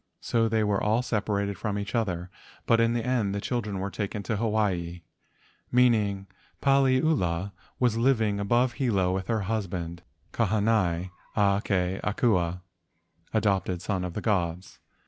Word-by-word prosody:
So 115 Hz, -1 st, +1 dB
they 110 Hz, -1 st, +2 dB
were 105 Hz, -2 st, +1 dB
all 110 Hz, +4 st, +2 dB
separated 100 Hz, -4 st, -1 dB
from 105 Hz, -2 st, -2 dB
each 100 Hz, 0 st, -4 dB
other, 90 Hz, -6 st, -1 dB, 0.3 s
but 115 Hz, -, +4 dB
in 115 Hz, 0 st, +3 dB
the 120 Hz, -1 st, -1 dB
end 115 Hz, -6 st, 0 dB
the -, -, -1 dB
children 105 Hz, -2 st, -2 dB
were 95 Hz, +1 st, -3 dB
taken 100 Hz, 0 st, -4 dB
to 110 Hz, -, -1 dB
Hawaii. 100 Hz, -6 st, -1 dB, 0.7 s
Meanwhile 110 Hz, -6 st, +3 dB, 0.3 s
Paliula 130 Hz, -, +2 dB, 0.3 s
was 120 Hz, -3 st, +2 dB
living 110 Hz, -5 st, +2 dB
above 120 Hz, +5 st, +2 dB
Hilo 100 Hz, -10 st, +1 dB
with 95 Hz, 0 st, -3 dB
her 110 Hz, -2 st, 0 dB
husband 90 Hz, -5 st, -3 dB, 0.3 s
Kahanai 100 Hz, -5 st, +1 dB, 0.2 s
a 100 Hz, -1 st, +3 dB
ke 95 Hz, -2 st, 0 dB
Akua 90 Hz, -5 st, +1 dB, 0.7 s
(adopted 95 Hz, -3 st, 0 dB
son 95 Hz, -3 st, -1 dB
of 90 Hz, -2 st, -5 dB
the 105 Hz, -, -2 dB
gods). 90 Hz, -4 st, -1 dB
105 Hz, 145 wpm, -27 LUFS, 95-115 Hz, 0.7 s, but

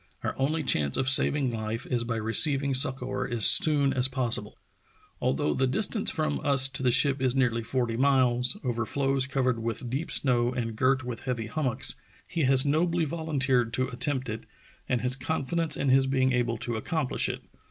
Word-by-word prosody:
Our -, -, -3 dB
only 155 Hz, +4 st, -1 dB
chance 70 Hz, -, 0 dB
of 130 Hz, -, -1 dB
saving 135 Hz, 0 st, +6 dB
life 110 Hz, +1 st, -5 dB
is 120 Hz, -2 st, -1 dB
by 115 Hz, 0 st, -4 dB
receiving 135 Hz, +6 st, +1 dB
succor 130 Hz, 0 st, -2 dB
as 115 Hz, -3 st, +1 dB
soon 145 Hz, -3 st, +5 dB
as 125 Hz, 0 st, +5 dB
possible. 130 Hz, -3 st, -2 dB, 0.6 s
Although 70 Hz, +2 st, -1 dB
the 130 Hz, -, 0 dB
distance 210 Hz, -, 0 dB
from 155 Hz, -3 st, -2 dB
us 135 Hz, -2 st, +3 dB
to 135 Hz, -, -5 dB
the 130 Hz, -, +1 dB
ship 140 Hz, +2 st, +1 dB
is 130 Hz, -1 st, +1 dB
nearly 120 Hz, -3 st, 0 dB
forty 120 Hz, 0 st, -2 dB
miles, 130 Hz, -, +3 dB
over 120 Hz, -3 st, -2 dB
floes 135 Hz, -1 st, -1 dB
covered 130 Hz, -3 st, -1 dB
with 115 Hz, +1 st, -5 dB
deep 145 Hz, +6 st, -4 dB
snow 120 Hz, -2 st, 0 dB
and 115 Hz, -3 st, -4 dB
girt 130 Hz, +3 st, +1 dB
with 120 Hz, -1 st, -6 dB
heavy 125 Hz, -4 st, -4 dB
hummocks, 130 Hz, 0 st, -2 dB, 0.3 s
he 165 Hz, -5 st, -2 dB
has 130 Hz, +1 st, +6 dB
nobly 165 Hz, +3 st, 0 dB
volunteered 135 Hz, -7 st, -1 dB
to 130 Hz, 0 st, -1 dB
attempt 130 Hz, +1 st, -2 dB
it, 110 Hz, 0 st, -7 dB, 0.4 s
and 125 Hz, -, 0 dB
has 125 Hz, 0 st, 0 dB
con 135 Hz, +2 st, -4 dB
fidence 165 Hz, +2 st, -1 dB
in 140 Hz, -, -1 dB
his 135 Hz, +1 st, +3 dB
being 130 Hz, -1 st, +1 dB
able 120 Hz, -2 st, -1 dB
to 115 Hz, 0 st, -4 dB
accomplish 150 Hz, +3 st, -2 dB
it. -, -, -6 dB
130 Hz, 185 wpm, -26 LUFS, 120-140 Hz, 0.6 s, saving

